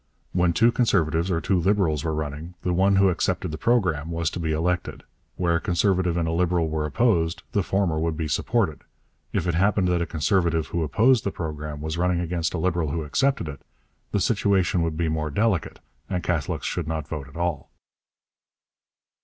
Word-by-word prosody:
When 90 -1 +3
two 115 +8 +4
Conservatives 85 -8 +1
or 85 -3 +1
two 95 +2 +1
Liberals 85 -5 +1
were 80 -2 -1
running, 75 +3 -5
the 90 - 0
one 95 +3 +3
who 95 0 +5
accepted 90 0 -1
the 80 - -4
Programme 90 -11 +1
was 85 -1 -1
to - - -5
be 80 -2 -1
elected; 85 +3 -1 0.3
where 85 -2 +1
a - - -5
Conservative 90 -2 +1
and 85 -1 0
a - - 0
Liberal 85 -1 +1
were 75 -1 -1
opposed, 85 - +1
the 100 - +1
former 95 -4 0
would 80 -1 -1
be 80 -2 -2
supported; 85 - 0 0.5
if - - -1
it 85 - 0
happened 95 +2 +2
that 90 -1 +1
a 85 - -1
Conservative 80 +1 +1
who 85 - -1
opposed 110 - +3
the - - 0
Programme 75 -4 -5
was 80 +2 -3
running 90 0 +1
against 85 0 -2
a - - -1
Liberal 85 -2 0
who 80 +2 -2
accepted 135 - 0
it, 70 -3 -7 0.5
'the 105 - +1
situation 95 -5 +2
would 80 -2 -1
be 85 -1 0
more 80 -1 -1
delicate' 100 +2 0 0.3
and 90 -1 -2
Catholics 80 -6 -1
should 85 -3 -2
not 80 -2 -3
vote 75 -4 -5
at 70 - -12
all. 85 -5 -2
85 Hz, 195 wpm, -24 LUFS, 80-95 Hz, 0.5 s, who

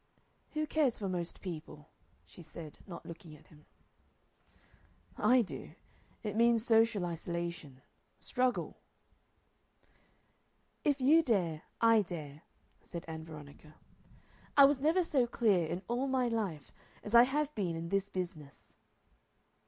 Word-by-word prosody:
"Who 310 0 0
cares 300 -6 +1
for 200 - -3
most 175 -2 -4
people?" 155 -4 -8 0.3
she - - -14
said, 160 -1 -10
not 175 - -9
looking 165 -2 -10
at 150 - -20
him. 150 -1 -19 1.5
"I 250 -1 +4
do. 195 - -8 0.5
It 210 -2 -3
means 230 0 +3
social 225 -5 +3
isolation 170 -5 -5 0.3
struggle." 255 -1 -1 2.1
"If 285 -2 +1
you 305 +6 +6
dare 180 - 0 0.2
I 230 -1 +6
dare," 155 -6 -7 0.4
said 170 - -8
Ann 160 -1 -6
Veronica. 150 -1 -12 0.8
"I 280 - +10
was 275 -1 +2
never 325 +5 +3
so 265 -7 +1
clear 205 -8 +2
in 175 +4 -4
all 245 +3 0
my 260 -2 +1
life 205 -10 -3 0.3
as 210 - -7
I 235 - +10
have 290 +4 +1
been 185 - -2
in 165 +1 -5
this 195 +1 0
business." 170 -7 -7
195 Hz, 130 wpm, -33 LUFS, 165-245 Hz, 2.1 s, I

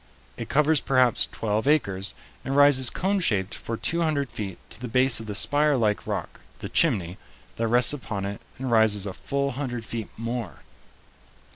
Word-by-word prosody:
It 115 - -7
covers 150 +1 +3
perhaps 130 -3 +2
twelve 110 +2 -1
acres, 100 -11 +1 0.3
and 135 - -3
rises 145 -3 +5
coneshaped 170 - 0
for 115 - -5
two 170 +9 0
hundred 145 -5 0
feet 100 -4 -5
to - - -9
the 125 - -4
base 125 +1 +3
of 110 - -8
the 105 - -4
spire 145 +5 +2
like 105 -3 0
rock, - - -4 0.2
the - - -7
"chimney," 95 - +1 0.4
that 115 - 0
rests 120 +3 +4
upon 105 -7 -4
it 100 0 -5 0.2
and 130 -1 -4
rises 110 -3 +3
a 100 - -4
full 140 +4 -2
hundred 125 -4 -4
feet 115 -2 -5
more. 115 -3 -5
120 Hz, 170 wpm, -25 LUFS, 105-140 Hz, 0.4 s, rises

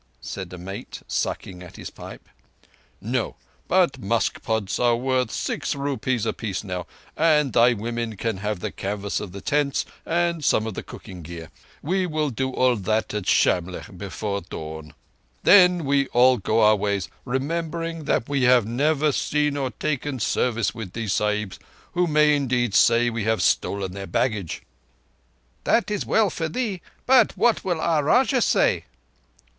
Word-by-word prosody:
said 95 -3 -7
a 90 - -8
mate, 95 +3 -8
sucking 90 -2 -3
at 90 - -12
the - - -10
pipe. - - -11 0.7
"No; 120 +4 -2 0.3
but - - +2
musk - - 0
pods 110 -4 -1
are 120 -1 +3
worth 130 0 0
six - - -2
rupees 130 -4 -1
apiece 105 -4 -3
now, 90 -3 -5 0.3
and 150 -3 +3
thy 120 +1 +5
women 115 0 -4
can 115 -1 -2
have 105 -1 -3
the - - -3
canvas 100 +1 -3
of 100 - -7
the 100 +1 -8
tents 145 -1 0 0.2
and 170 -1 0
some 110 -5 +2
of 110 - -4
the - - -5
cooking 90 -2 -10
gear. 80 -1 -9 0.3
We 185 +4 0
will 155 -3 -1
do 130 +2 -2
all 130 -1 +2
that 110 +2 -1
at 105 -3 -3
Shamlegh 90 +2 +1
before 100 +2 -4
dawn. 80 -2 -8 0.5
Then 180 -4 +6
we 140 0 +2
all 125 +1 +4
go 110 +2 +1
our 105 0 +6
ways, 100 -2 -1 0.2
remembering 165 +4 -3
that 125 - 0
we 140 -1 0
have 125 -3 +5
never 145 +6 +1
seen 150 +1 0
or 135 -2 -1
taken 145 -1 -3
service 115 0 0
with 105 -6 -7
these 110 -4 -2
Sahibs, 105 -2 -1 0.3
who 180 0 +2
may, 150 -1 +4
indeed, 125 -5 0
say 120 +2 +4
that - - -6
we 115 -3 -2
have 110 0 +1
stolen 100 -2 +1
their 100 +1 -7
baggage." 105 - -1 1.0
"That 230 -2 +2
is 210 - -2
well 215 -4 +3
for 165 -1 -3
thee, 205 -2 -3 0.2
but 260 0 +4
what 240 -2 +2
will 175 -4 -1
our 160 -2 +1
Rajah 255 - +3
say?" - - +2
120 Hz, 165 wpm, -24 LUFS, 100-150 Hz, 1.0 s, Then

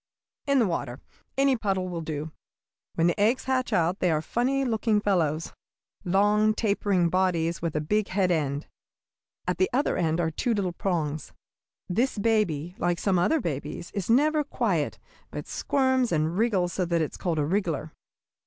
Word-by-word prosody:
"In 280 0 +3
the 240 - +4
water; 140 -8 -3 0.4
any 275 -1 +4
puddle 195 -5 -1
will 175 -2 -4
do. 155 -1 -4 0.6
When 165 - +2
the 175 +2 +1
eggs 225 +6 +2
hatch 260 -2 0
out 180 -1 +1
they 180 - +2
are 155 -2 +2
funny 255 - 0
looking 220 -2 +1
fellows, 165 -6 0 0.5
long, 210 +3 +3
tapering 200 -5 +1
bodies 170 -2 +1
with 165 -2 -2
a 150 - +1
big 210 +7 0
head 190 -2 +1
end. 145 -3 -1 0.8
At 180 - -1
the 185 - +3
other 270 +4 +1
end 165 -1 +1
are 165 -2 0
two 230 +8 0
little 190 -4 -1
prongs. 160 -5 -2 0.5
This 235 +7 0
baby, 200 -7 +1
like 175 0 +1
some 185 0 +1
other 315 - +2
babies, 150 - -4
is 200 -2 -3
never 300 +5 +4
quiet, 290 - -1 0.3
but - - -6
squirms 260 -3 +1
and 160 +1 +1
wriggles 190 -5 +1
so 185 - 0
that 170 -1 +1
it 155 - -1
is - - -10
called 170 -3 -1
a 150 - +1
wriggler. 165 -4 -1
185 Hz, 170 wpm, -27 LUFS, 165-220 Hz, 0.8 s, the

